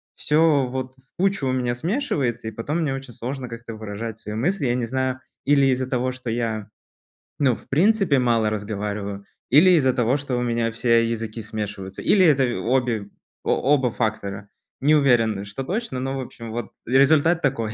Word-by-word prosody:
всё 150 -3 +3
вот 130 0 -5
в 130 +1 -27
кучу 190 -7 +1
у 130 - +1
меня 125 -2 0
смешивается, 140 - -1
и - - -3
потом 140 +10 -3
мне 145 -4 0
очень 135 -2 -7
сложно 130 +3 -5
как-то 115 -1 -8
выражать 110 +1 -6
свои 105 -1 -6
мысли. 165 - 0
Я 120 - +1
не 125 -2 -1
знаю, 130 +1 -1 0.3
или 140 -1 +4
из-за 130 0 +1
того, 130 0 0
что 125 -2 -7
я, 110 -2 -2 0.7
ну, 130 -5 +3
в - - -16
принципе 180 -1 +3
мало 115 -3 +2
разговариваю, 100 -1 -4 0.3
или 155 +8 +7
из-за 135 -7 +4
того, 125 +3 +2
что 135 -3 -3
у - - 0
меня 115 -1 0
все 115 0 +2
языки 115 0 -4
смешиваются, 105 -3 -6
или 190 -3 +5
это 140 -5 +4 0.2
обе 120 -4 0 0.3
о 140 +3 +2
оба 130 -4 0
фактора. 100 -3 -3 0.3
Не 150 +3 +5
уверен, 115 -8 +3
что 105 +7 -5
точно, 195 - -3
но, 135 +1 -3
в - - -3
общем, 115 -3 -8
вот, 115 -2 -5
результат 145 +6 +4
такой. 115 -5 -1
125 Hz, 185 wpm, -23 LUFS, 110-140 Hz, 0.7 s, или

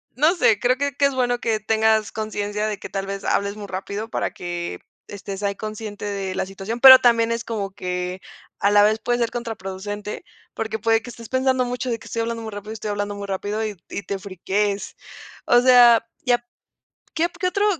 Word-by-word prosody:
no 305 +8 +3
sé, 225 - +3
creo 250 +1 +2
que 285 0 -2
que 280 - +3
es 280 -1 +1
bueno 245 -1 +1
que 225 -2 0
tengas 220 0 +2
conciencia 210 -1 -3
de 210 -1 -3
que - - -8
tal 195 -1 -3
vez, 195 0 -5
hables 200 0 0
muy 210 -1 -8
rápido 200 +3 -5
para - - -2
que 175 -1 -5 0.3
estés 200 -1 -7
ahí 200 0 0
consciente 215 0 -6
de 195 -2 -3
la - - -1
situación, 195 +5 -6
pero 260 0 +11
también 230 -2 +3
es 230 0 -2
como 205 -4 -4
que 180 0 -4 0.4
a 200 - +3
la 205 0 +6
vez 215 +1 +3
puedes 240 +2 0
ser 230 - 0
contraproducente 205 -3 -5 0.3
porque 220 0 -3
puede 225 +1 +2
que 245 - -10
estés 230 -2 -11
pensando 260 -1 +1
mucho 250 +1 -3
de 230 - -1
que - - -16
estoy 230 - -4
hablando 230 0 -3
muy 220 - -6
rápido 205 +1 -7
estoy 215 -1 -5
hablando 205 0 -3
muy 200 0 -6
rápido 205 +3 -2
y 210 -1 -4
y 205 - -5
te 200 -1 -4
friquees, 200 +2 -2 0.5
o 240 - +5
sea, 245 -2 +7 0.2
ya 245 -1 +4
p - - -33 0.7
¿Qué 325 - +1
o - - -1
qué 350 +1 -3
otro 400 +3 +1
215 Hz, 215 wpm, -22 LUFS, 200-240 Hz, 0.7 s, pero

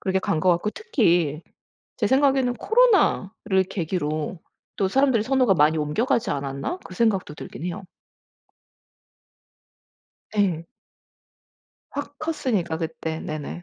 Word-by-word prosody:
그렇게 190 0 0
간 160 -4 -1
것 185 - +4
같고 175 +5 +1
특히 175 - +1 0.6
제 - - +1
생각에는 265 -2 +3
'코로나를 235 - +2
계기로 160 -2 -2 0.4
또 195 - +2
사람들이 260 +1 +3
선호가 255 -4 +3
많이 155 -1 +3
옮겨가지 200 - 0
않았나?' 140 - -3
그 185 - -10
생각도 195 -8 +1
들긴 165 - -8
해요. 185 +3 -4 2.5
예. 180 -6 +1 1.3
확 285 0 -6
컸으니까 250 - -1
그때. 160 -1 -4
네네. 155 +3 -6
190 Hz, 245 characters per minute, -24 LUFS, 160-255 Hz, 2.5 s, 것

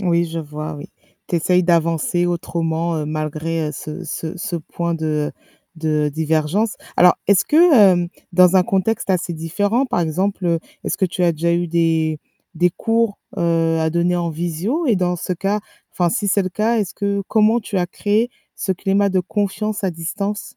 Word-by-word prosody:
Oui, 170 -3 +2
je 165 0 -5
vois, 155 0 -6
oui. 145 - -8 0.4
Tu 175 - 0
essayes 180 +2 +2
d'avancer 170 0 +1
autrement, 170 -1 -1
heu, 155 - -2
malgré, 155 +1 -2
heu, - - -5
ce 150 +2 -7
ce 165 +2 -5
ce 175 0 -3
point 170 +1 -3
de, 160 -1 -3
heu, 150 -1 -1 0.4
de 155 -2 0
divergence. 160 +7 0 0.2
Alors 180 0 +6
est-ce 200 -1 +4
que, 330 +3 +5
hem, 185 -6 +5 0.2
dans 180 +1 +6
un 185 - +6
contexte 195 +4 0
assez 180 -1 0
différent, 205 +10 0
par 180 - 0
exemple, 185 +4 -1
heu, 170 -1 +2 0.3
est-ce - - -1
que 195 - +1
tu 180 0 -2
as 175 -1 +4
déjà 170 +2 0
eu 175 +1 +1
des 160 -2 +1 0.4
des 175 +2 +3
cours, 225 +2 0 0.2
heu, 165 -1 +1
à 160 0 +1
donner 170 +2 +1
en 170 -1 -1
visio 175 - -2
et 230 -6 +3
dans 180 -1 0
ce 180 - -3
cas, 195 +4 -1 0.3
enfin, 175 -1 +1
si 215 0 -1
c'est 200 +1 +3
le 185 - -2
cas, 225 +5 +1
est-ce 200 -4 -2
que 200 0 -1
comment 220 +2 +3
tu 210 -2 -5
as 175 - 0
créé 210 +6 0 0.3
ce 190 - -1
climat 195 +2 +1
de 185 -1 +2
confiance 205 +2 -2
à 190 - +1
distance? 200 +7 -4
175 Hz, 195 wpm, -20 LUFS, 165-200 Hz, 0.4 s, Alors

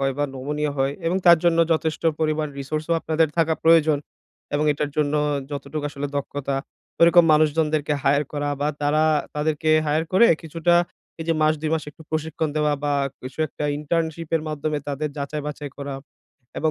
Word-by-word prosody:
হয় 135 0 +1
বা 145 - +2
নমুনীয় 145 +3 -2
হয় 135 +1 +1
এবং 175 - +1
তার 170 -1 +8
জন্য 170 -1 +3
যথেষ্ট 160 0 -1 0.2
পরিমাণ 155 -1 0
রিসোর্স 155 +3 -3
ও - - +4
আপনাদের 160 0 +1
থাকা 165 -1 +3
প্রয়োজন। 160 -2 +5 0.6
এবং 150 +1 +1
এটার 145 0 -3
জন্য 150 -1 +1 0.4
যতটুকু 145 +1 -5
আসলে 145 0 -4
দক্ষতা 140 -1 -3 0.4
ঐরকম 170 0 +7
মানুষজনদেরকে 155 -1 +2
হায়ার 145 +1 +3
করা 145 0 -2
বা 145 - +1
তারা 150 +2 +2 0.3
তাদেরকে 155 +1 0 0.2
হায়ার 155 +2 +1
করে 215 +5 +6 0.2
কিছুটা 165 +2 +1 0.5
এই - - -3
যে 165 - +4
মাস 155 0 +4
২ 155 0 -2
মাস 160 - -2
একটু 160 - -16
প্রশিক্ষণ 155 0 -2
দেওয়া 150 -1 +2
বা 145 - +1 0.3
কিছু 130 +3 -9
একটা 150 - -6
ইন্টার্নশিপ 160 +1 -2
এর 155 - -4
মাধ্যমে 150 0 -2
তাদের 145 +2 -2
যাচাই-বাছাই 145 0 -5
করা 140 -1 -5 0.6
এবং 155 - +1
150 Hz, 170 wpm, -23 LUFS, 145-160 Hz, 0.6 s, তার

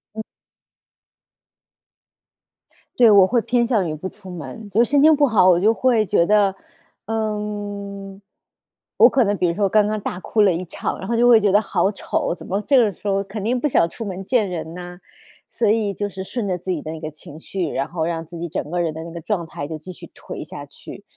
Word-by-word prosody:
嗯。 220 - -4 2.7
对， 235 -3 +7
我 200 -3 +7
会 235 +3 +1
偏 240 +2 +1
向 210 -9 +1
于 155 - -3
不 185 +5 -6
出 190 -1 -12
门， 205 +5 -8
就 220 +5 +3
是 - - -3
心 285 -1 +4
情 310 0 +7
不 290 0 +4
好， 205 -7 +4
我 175 -1 +5
就 215 +4 +4
会 235 -3 +2
觉 170 -1 +2
得， 205 -2 +3 0.5
嗯， 205 -2 -4 0.8
我 - - +8
可 260 -3 +3
能 205 0 +1
比 180 -2 +1
如 170 - 0
说 205 -2 +2
刚 210 +1 +3
刚 215 0 -2
大 185 -2 -5
哭 215 +3 +1
了 190 -4 +4
一 175 +3 -3
场， - - -4
然 190 - -6
后 235 - 0
就 240 +1 +4
会 230 -3 +7
觉 205 -2 +2
得 205 - +5
好 195 -2 0
丑， 190 - -2
怎 - - -11
么 195 +3 -2
这 270 +6 +3
个 215 -5 +3
时 205 - -9
候 195 0 +1
肯 200 +1 -7
定 245 +3 0
不 300 - +1
想 170 - +2
出 225 - -7
门 190 -1 -5
见 220 -1 +1
人 165 -2 -5
呐。 180 0 -9 0.5
所 230 - -1
以 210 -2 +1
就 205 +2 -3
是 190 0 -7
顺 215 +1 -4
着 180 -1 -1
自 180 +2 -9
己 160 -5 -2
的 155 - -5
那 160 - -7
个 155 -1 -5
情 150 +1 -12
绪， 180 -1 -3
然 135 - -2
后 160 -2 -3
让 165 -1 -3
自 170 +1 -11
己 175 - -3
整 150 - -4
个 175 - -1
人 165 -2 -1
的 160 +1 -7
那 170 - -9
个 170 -1 -7
状 175 -1 -2
态 145 - -6
就 160 -1 -5
继 185 +5 -10
续 - - -12
颓 - - -8
下 - - -9
去。 - - -12
200 Hz, 255 characters per minute, -21 LUFS, 175-220 Hz, 2.7 s, 我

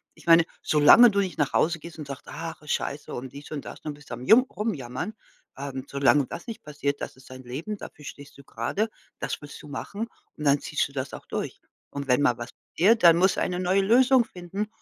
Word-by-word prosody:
ich - - -18
meine, 165 0 +7 0.2
solange 155 +11 +7
du 200 - +1
nicht 190 -2 -1
nach 145 -2 0
Hause 170 +1 +2
gehst 165 +1 -11
und 150 - -7
sagst: 140 -2 -7
„Ach, 165 +1 -7
ist 150 - -2
Scheiße“, 145 - -4
und 130 +1 -6
dies 140 +2 -11
und 150 -3 -4
das - - -9
und 150 - -3
bist 150 +1 -16
du 120 - -4
am 125 +2 -9
Jum 230 +4 +8
Rumjammern, 205 - -4 0.4
ähm 135 -1 -5
solange 140 0 +3
das - - -8
nicht 225 - -7
passiert, 145 -1 -3
das - - -6
ist 130 0 -17
dein 130 0 -10
Leben, 150 - -5
dafür 150 - -11
stehst 140 0 -10
du 140 - -14
grade, 165 - -2 0.3
das - - -3
willst 145 - -10
du 150 - -12
machen 200 +10 -5 0.3
und 150 - -8
dann 140 -1 +4
ziehst 150 - -1
du - - -16
das 130 -1 -4
auch - - -9
durch. - - -4 0.3
Und 140 -1 -6
wenn 125 +2 +3
mal 125 -4 +3
was 120 0 -6 0.3
passiert, 210 +6 +4
dann 170 -1 +9
muss 185 +2 +3
eine 180 -1 -1
neue 185 +2 +3
Lösung 245 +4 +5
finden 185 +4 -5
150 Hz, 235 wpm, -26 LUFS, 140-190 Hz, 0.4 s, dann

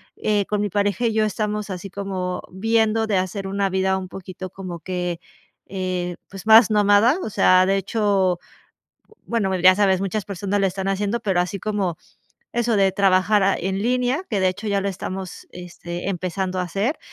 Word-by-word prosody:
eh, 205 -2 0
con 210 +1 -1
mi 205 - -1
pareja 205 +4 0
y 225 - -1
yo 220 0 +2
estamos 210 0 -2
así 185 +1 -6
como 185 -2 -4
viendo 225 +2 +1
de 210 -3 +1
hacer 190 +1 -2
una 195 0 0
vida 190 0 +1
un 190 -1 -5
poquito 185 0 -8
como 180 -2 -7
que, 180 -1 -3 0.5
eh, 185 -2 -3
pues, 195 0 -10
más 220 0 +8
nómada. 210 - +4
O - - -4
sea, 185 -2 +4
de 195 +1 +2
hecho 195 -3 +1 0.9
bueno, 205 -5 0
ya 185 +1 +7
sabes, 195 -2 +2
muchas 195 +1 -2
personas 200 +1 -2
lo 195 - +2
están 190 +1 -4
haciendo, 200 +4 -1
pero 195 -5 0
así 180 +3 -2
como, 200 -5 -2 0.5
eso, 235 -1 +1
de 195 -1 +3
trabajar 195 +1 +3
en 190 +2 -2
línea, 250 - 0
que, 210 - 0
de 190 - +3
hecho, 200 +4 -6
ya 200 -1 +1
lo 200 - -2
estamos, 190 0 -6
este, 175 0 -6
empezando 185 0 -2
a - - 0
hacer. 200 - -2
195 Hz, 180 wpm, -22 LUFS, 185-210 Hz, 0.9 s, más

